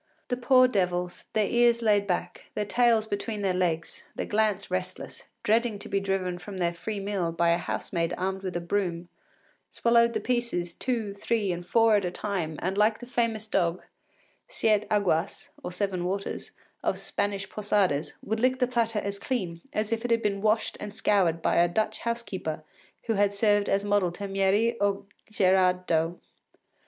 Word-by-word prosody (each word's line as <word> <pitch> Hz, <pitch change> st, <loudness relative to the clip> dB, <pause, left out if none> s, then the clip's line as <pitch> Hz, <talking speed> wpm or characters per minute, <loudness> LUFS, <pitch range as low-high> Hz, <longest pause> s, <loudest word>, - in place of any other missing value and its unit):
The 245 Hz, -, +1 dB
poor 255 Hz, 0 st, +5 dB
devils, 180 Hz, -5 st, -1 dB
their 215 Hz, -1 st, +2 dB
ears 235 Hz, +1 st, +3 dB
laid 205 Hz, -2 st, +3 dB
back, 180 Hz, -1 st, -3 dB
their 210 Hz, -, -1 dB
tails 230 Hz, 0 st, +3 dB
between 205 Hz, 0 st, -3 dB
their 190 Hz, -2 st, +2 dB
legs, 170 Hz, -3 st, -1 dB
their -, -, -3 dB
glance 210 Hz, -2 st, 0 dB
restless, 185 Hz, 0 st, -4 dB, 0.2 s
dreading 225 Hz, 0 st, +2 dB
to 200 Hz, -, -8 dB
be 200 Hz, -, 0 dB
driven 190 Hz, -2 st, -2 dB
from 190 Hz, +2 st, -8 dB
their 175 Hz, -1 st, 0 dB
free 205 Hz, +5 st, -4 dB
meal 195 Hz, -4 st, -1 dB
by 170 Hz, +1 st, +2 dB
a 170 Hz, -, +2 dB
housemaid 170 Hz, 0 st, -2 dB
armed 190 Hz, +1 st, -2 dB
with 185 Hz, -2 st, -5 dB
a -, -, -3 dB
broom, 175 Hz, -2 st, -2 dB, 0.6 s
swallowed 235 Hz, 0 st, +3 dB
the -, -, 0 dB
pieces 235 Hz, -9 st, -1 dB
two, 230 Hz, -4 st, -2 dB
three, 205 Hz, -1 st, -1 dB
and 175 Hz, 0 st, -5 dB
four 225 Hz, +1 st, +5 dB
at 200 Hz, -, -1 dB
a -, -, 0 dB
time, 175 Hz, -5 st, -3 dB
and 190 Hz, +3 st, -1 dB
like 215 Hz, +1 st, +4 dB
the 245 Hz, -, -9 dB
famous 230 Hz, -3 st, -1 dB
dog, 180 Hz, -4 st, 0 dB, 0.6 s
Siete 215 Hz, -, +1 dB
Aguas 195 Hz, -4 st, 0 dB, 0.2 s
(Seven 185 Hz, -1 st, -2 dB
Waters), 195 Hz, +2 st, -3 dB, 0.3 s
of -, -, 0 dB
Spanish 200 Hz, -1 st, -2 dB
posadas, 195 Hz, -8 st, 0 dB
would 220 Hz, +1 st, -2 dB
lick 255 Hz, +2 st, +2 dB
the 250 Hz, -, +2 dB
platter 230 Hz, -3 st, 0 dB
as 200 Hz, -1 st, -3 dB
clean 185 Hz, -9 st, -3 dB
as 215 Hz, +1 st, -2 dB
if 225 Hz, 0 st, -1 dB
it 245 Hz, -, -2 dB
had 230 Hz, 0 st, +2 dB
been 200 Hz, -1 st, 0 dB
washed 215 Hz, +1 st, +1 dB
and 205 Hz, 0 st, -7 dB
scoured 185 Hz, -7 st, +2 dB
by -, -, +2 dB
a 170 Hz, +1 st, +5 dB
Dutch 215 Hz, +4 st, -1 dB
housekeeper 195 Hz, -10 st, -3 dB, 0.4 s
who 225 Hz, -, 0 dB
had 200 Hz, -1 st, +2 dB
served 205 Hz, -1 st, +2 dB
as 195 Hz, +1 st, +2 dB
model 205 Hz, -3 st, +2 dB
to 200 Hz, +2 st, -5 dB
Mieris 195 Hz, +4 st, +2 dB
or 200 Hz, 0 st, +1 dB, 0.3 s
Gerard 185 Hz, -3 st, +3 dB
Dow. 165 Hz, 0 st, +1 dB
200 Hz, 180 wpm, -27 LUFS, 180-220 Hz, 0.6 s, poor